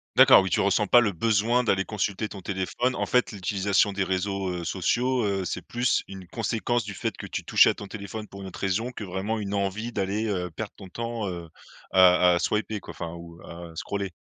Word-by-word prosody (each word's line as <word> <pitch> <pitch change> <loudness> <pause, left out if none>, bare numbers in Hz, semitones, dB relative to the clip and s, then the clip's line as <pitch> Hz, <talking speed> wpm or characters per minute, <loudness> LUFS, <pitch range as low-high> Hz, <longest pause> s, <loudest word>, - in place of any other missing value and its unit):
D'accord, - - +8
oui, 95 - -2
tu - - +1
ressens 100 +1 +2
pas 120 +5 +7
le 110 -4 +1
besoin 115 +6 +2
d'aller 95 -5 +1
consulter 105 0 -2
ton 100 -2 -9
téléphone. 100 +7 -1
En - - -1
fait, 125 0 +2
l'utilisation 100 0 +1
des 100 0 0
réseaux, 95 0 -1
heu, 90 -1 -4
sociaux, 120 +8 0
heu, 100 -2 -1
c'est - - -3
plus 120 +1 0
une 95 -2 -10
conséquence, 115 +4 -1
du 100 - -6
fait - - -3
que - - -8
tu - - -4
touchais - - +6
à - - +2
ton 100 - -8
téléphone 105 +1 -7
pour 100 0 -10
une 95 - -7
autre - - -9
raison, 100 +6 -1
que 115 - -7
vraiment 95 +4 -3
une 100 -1 -4
envie 100 +4 -2
d'aller, 100 +2 -1
heu, 90 -4 -2
perdre 100 +6 -6
ton 95 -2 -11
temps, 115 0 -4
heu, 85 -2 -6 0.5
à 90 -1 +6
à 85 - +1
swiper, 105 +2 -1
quoi, - - -10
enfin 85 0 -6
ou 85 0 -11
à 85 0 -9
scroller. 100 +3 -3
100 Hz, 225 wpm, -26 LUFS, 95-110 Hz, 0.5 s, D'accord